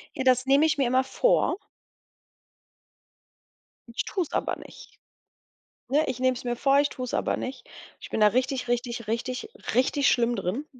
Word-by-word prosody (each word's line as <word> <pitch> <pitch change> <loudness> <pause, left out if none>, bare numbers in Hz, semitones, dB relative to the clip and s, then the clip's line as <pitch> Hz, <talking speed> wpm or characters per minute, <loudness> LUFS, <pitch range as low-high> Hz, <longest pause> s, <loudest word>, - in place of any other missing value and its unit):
Ja, - - -2
das 255 0 +3
nehme 275 +3 +4
ich 310 -1 +1
mir 270 -3 +2
immer 255 +2 +3
vor. 360 - +2 2.4
Ich - - -1
tue 375 - -1
es 320 - -12
aber - - -1
nicht, - - -14 0.9
ne, 295 +5 +2
ich 250 - -3
nehme 255 0 +2
es 255 - -8
mir 240 -1 -2
vor, 275 +3 +3
ich 285 - +2
tue 255 - -6
es 250 - -5
aber - - 0
nicht. 260 - -6 0.3
Ich - - -10
bin - - -2
da 210 - +7
richtig, 255 +3 -1
richtig, 240 -1 -2
richtig, 250 - -3 0.2
richtig 270 +3 +3
schlimm 240 0 +2
drin. 200 - -3
255 Hz, 180 wpm, -26 LUFS, 240-275 Hz, 2.4 s, da